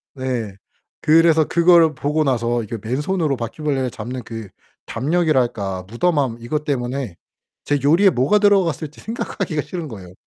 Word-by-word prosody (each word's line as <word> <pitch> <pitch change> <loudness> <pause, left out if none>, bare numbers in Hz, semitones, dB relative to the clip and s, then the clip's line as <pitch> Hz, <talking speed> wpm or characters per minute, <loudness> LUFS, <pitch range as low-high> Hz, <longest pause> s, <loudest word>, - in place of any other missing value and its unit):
네. 125 -6 -3 0.5
그래서 160 0 +5
그걸 170 -2 +5
보고 150 +3 0
나서 120 -3 0
이렇게 110 0 -7
맨손으로 150 +2 0
바퀴벌레를 130 +2 -2
잡는 125 +2 -6
그 115 -3 -8 0.4
담력이랄까? 125 - 0
무덤함 130 - 0
이것 150 +6 -3
때문에 130 - -2 0.5
제 145 -1 0
요리에 170 +8 +5
뭐가 140 +8 +2
들어갔을지 175 -7 +1
생각하기가 195 -8 -3
싫은 160 +4 -6
거예요. 95 -8 -10
140 Hz, 345 characters per minute, -20 LUFS, 120-160 Hz, 0.5 s, 그래서